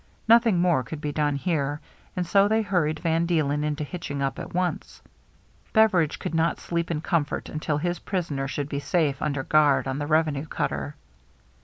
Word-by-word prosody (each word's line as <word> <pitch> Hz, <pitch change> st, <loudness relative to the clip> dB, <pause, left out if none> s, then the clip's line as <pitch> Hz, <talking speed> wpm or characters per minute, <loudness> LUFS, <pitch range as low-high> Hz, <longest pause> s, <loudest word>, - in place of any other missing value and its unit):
Nothing 230 Hz, -4 st, +5 dB
more 175 Hz, -6 st, +3 dB
could 145 Hz, +5 st, -7 dB
be 150 Hz, 0 st, -3 dB
done 145 Hz, -1 st, 0 dB
here, 145 Hz, -2 st, -1 dB, 0.4 s
and 180 Hz, -, -1 dB
so 195 Hz, +3 st, +4 dB
they 220 Hz, +1 st, +2 dB
hurried 165 Hz, -6 st, 0 dB
Van 165 Hz, 0 st, +1 dB
Deelen 150 Hz, -4 st, +1 dB
into 150 Hz, 0 st, -2 dB
hitching 145 Hz, -2 st, -5 dB
up 135 Hz, 0 st, -2 dB
at 170 Hz, -, -7 dB
once. 180 Hz, 0 st, -2 dB, 0.7 s
Beveridge 195 Hz, -9 st, +3 dB
could -, -, -5 dB
not 165 Hz, 0 st, +1 dB
sleep 170 Hz, 0 st, -2 dB
in 155 Hz, -3 st, -2 dB
comfort 160 Hz, -3 st, -1 dB
until 155 Hz, -1 st, -2 dB
his 175 Hz, +3 st, -2 dB
prisoner 155 Hz, -8 st, -3 dB
should 140 Hz, +1 st, -3 dB
be 140 Hz, -1 st, -3 dB
safe 145 Hz, -1 st, 0 dB
under 140 Hz, -3 st, -1 dB
guard 150 Hz, -3 st, +3 dB
on 135 Hz, +1 st, -2 dB
the 145 Hz, -, -3 dB
revenue 155 Hz, -2 st, +1 dB
cutter. 70 Hz, -, -3 dB
155 Hz, 180 wpm, -25 LUFS, 145-175 Hz, 0.7 s, Nothing